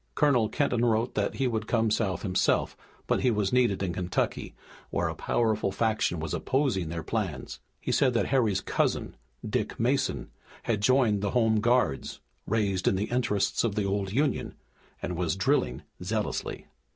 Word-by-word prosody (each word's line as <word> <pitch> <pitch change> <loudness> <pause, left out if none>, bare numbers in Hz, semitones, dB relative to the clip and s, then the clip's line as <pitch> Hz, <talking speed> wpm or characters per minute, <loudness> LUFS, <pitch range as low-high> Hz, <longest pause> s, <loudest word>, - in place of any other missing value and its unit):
Colonel 130 -8 +3
Kenton 120 +2 +1
wrote 115 -1 +1
that 100 -1 -1
he 135 - 0
would 110 -4 -1
come 115 -2 +2
South 100 -4 0
himself, 95 -3 +1 0.3
but - - +1
he 125 - +3
was 105 -3 0
needed 120 -6 +2
in 90 -3 -1
Kentucky, 90 0 -2 0.3
where - - 0
a - - -2
powerful 110 -4 0
faction 110 -5 0
was 80 -1 -4
opposing 130 - 0
their 80 0 -4
plans. 90 - -3 0.2
He - - -3
said 130 -3 +3
that 115 - +2
Harry's 110 -8 +2
cousin, - - -1 0.3
Dick - - -2
Mason, - - 0 0.3
had 110 -3 0
joined 115 -4 +3
the 100 - 0
home 110 -2 +3
guards, 120 - +1 0.3
raised 100 -4 0
in - - +4
the 100 +4 -2
interests 115 -5 +1
of 110 -4 0
the 105 -2 0
old 100 -1 -1
Union, 140 +7 0 0.5
and 90 - -2
was 85 -1 0
drilling 95 - +1 0.2
zealously. 105 +3 -3
105 Hz, 165 wpm, -28 LUFS, 95-120 Hz, 0.5 s, in